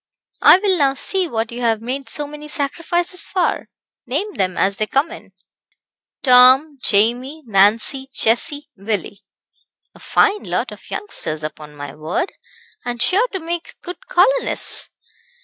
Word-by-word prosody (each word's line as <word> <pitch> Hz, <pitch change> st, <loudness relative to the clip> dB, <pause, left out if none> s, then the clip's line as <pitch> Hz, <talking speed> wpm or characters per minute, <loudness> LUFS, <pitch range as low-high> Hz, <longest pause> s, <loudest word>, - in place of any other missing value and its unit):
"I -, -, +8 dB
will 380 Hz, -1 st, +1 dB
now 275 Hz, -3 st, +2 dB
see 375 Hz, +6 st, 0 dB
what 225 Hz, -5 st, -3 dB
you 240 Hz, +1 st, -6 dB
have 225 Hz, -2 st, +1 dB
made 260 Hz, +4 st, -5 dB
so 295 Hz, -, -1 dB
many 300 Hz, +1 st, -10 dB
sacrifices 335 Hz, +4 st, -1 dB
for. 370 Hz, -2 st, -1 dB, 0.4 s
Name 415 Hz, 0 st, -2 dB
them 185 Hz, -1 st, -2 dB
as 195 Hz, 0 st, +1 dB
they 215 Hz, -, -1 dB
come 275 Hz, +8 st, 0 dB
in." -, -, -12 dB, 0.9 s
"Tom, 260 Hz, +3 st, +6 dB
Jamie, 245 Hz, +9 st, +1 dB
Nancy, 225 Hz, +6 st, +3 dB
Jessie, 285 Hz, +6 st, -1 dB
Willie." 200 Hz, -1 st, -4 dB, 0.7 s
"A -, -, -17 dB
fine 415 Hz, 0 st, +2 dB
lot -, -, -2 dB
of -, -, -13 dB
youngsters, 155 Hz, -, -4 dB
upon 150 Hz, -1 st, -7 dB
my 145 Hz, 0 st, -8 dB
word, 160 Hz, -, -3 dB, 0.5 s
and 240 Hz, -1 st, -4 dB
sure 405 Hz, -, +3 dB
to 385 Hz, -, -5 dB
make 335 Hz, 0 st, -5 dB
good 365 Hz, +8 st, -9 dB
colonists." -, -, +1 dB
270 Hz, 145 wpm, -19 LUFS, 220-345 Hz, 0.9 s, I